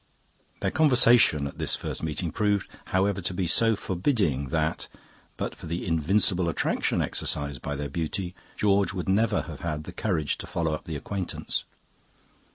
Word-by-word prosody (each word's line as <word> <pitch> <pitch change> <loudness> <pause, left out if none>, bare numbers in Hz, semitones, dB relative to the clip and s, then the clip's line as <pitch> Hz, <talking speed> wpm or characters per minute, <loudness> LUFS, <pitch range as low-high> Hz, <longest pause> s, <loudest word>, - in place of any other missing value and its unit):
"Their - - 0
conversation 120 - +5
at 70 - -7
this - - +1
first - - -4
meeting 80 +1 -2
proved, 105 0 +1 0.2
however, 95 +1 +1
to 90 - -2
be 90 - 0
so 110 +7 +4
forbidding 90 - 0
that, 80 +3 -1 0.5
but - - -3
for - - -10
the 85 +2 -3
invincible 90 +2 +2
attraction - - 0
exercised 70 -3 -2
by 75 - -3
their 70 +1 -3
beauty, 90 +3 -3 0.2
George 100 -1 +2
would 90 -3 -4
never 105 +2 +2
have 75 -5 -8
had 75 -3 -3
the 90 - -9
courage 85 -7 -1
to - - -7
follow 80 -2 -1
up 75 - -5
the 80 - -5
acquaintance. 95 +5 -3
90 Hz, 165 wpm, -27 LUFS, 75-100 Hz, 0.5 s, conversation